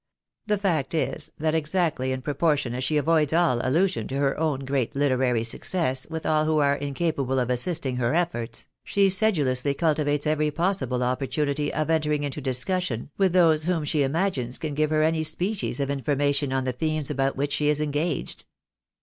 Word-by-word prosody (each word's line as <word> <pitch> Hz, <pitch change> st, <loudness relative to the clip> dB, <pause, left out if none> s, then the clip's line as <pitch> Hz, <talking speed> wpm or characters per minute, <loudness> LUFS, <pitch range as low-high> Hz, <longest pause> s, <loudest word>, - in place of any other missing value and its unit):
The 210 Hz, -1 st, +1 dB
fact 170 Hz, -7 st, -1 dB
is, 155 Hz, -, -1 dB
that 155 Hz, 0 st, 0 dB
exactly 155 Hz, -4 st, 0 dB
in 130 Hz, 0 st, -4 dB
proportion 145 Hz, -3 st, 0 dB
as 125 Hz, +1 st, -3 dB
she 150 Hz, +4 st, +1 dB
avoids 155 Hz, 0 st, +2 dB
all 165 Hz, -8 st, +3 dB
allusion 130 Hz, -, +1 dB
to 135 Hz, -, -5 dB
her 140 Hz, -1 st, +1 dB
own 150 Hz, -4 st, -1 dB
great 135 Hz, -3 st, -1 dB
literary 130 Hz, -4 st, +1 dB
success 130 Hz, +2 st, 0 dB
with 160 Hz, -1 st, -5 dB
all 155 Hz, 0 st, +2 dB
who 155 Hz, 0 st, +1 dB
are 140 Hz, -1 st, +3 dB
incapable 140 Hz, -1 st, -2 dB
of 125 Hz, -1 st, 0 dB
assisting 130 Hz, 0 st, 0 dB
her 120 Hz, -1 st, 0 dB
eflbrts, 165 Hz, -9 st, -2 dB, 0.2 s
she 200 Hz, -1 st, +2 dB
sedulously 145 Hz, -, +2 dB
cultivates 150 Hz, -2 st, 0 dB
every 155 Hz, 0 st, +1 dB
possible 165 Hz, -6 st, 0 dB
opportunity 140 Hz, +3 st, -1 dB
of 155 Hz, +1 st, -1 dB
entering 150 Hz, -2 st, +1 dB
into 145 Hz, +1 st, -4 dB
discussion 135 Hz, -, -2 dB
with 190 Hz, -3 st, +3 dB
those 160 Hz, -4 st, +4 dB
whom 175 Hz, -3 st, 0 dB
she 150 Hz, 0 st, 0 dB
imagines 135 Hz, -4 st, -1 dB
can 155 Hz, -2 st, -4 dB
give 155 Hz, +1 st, +1 dB
her 155 Hz, 0 st, +2 dB
any 160 Hz, 0 st, +1 dB
species 180 Hz, +4 st, -1 dB
of 140 Hz, 0 st, -1 dB
information 140 Hz, +1 st, 0 dB
on 135 Hz, 0 st, 0 dB
the 130 Hz, -1 st, -2 dB
themes 155 Hz, +2 st, -1 dB
about 135 Hz, -1 st, 0 dB
which 140 Hz, +1 st, -2 dB
she 150 Hz, -1 st, 0 dB
is 150 Hz, 0 st, +2 dB
engaged. 150 Hz, +1 st, -2 dB
150 Hz, 180 wpm, -25 LUFS, 135-160 Hz, 0.2 s, those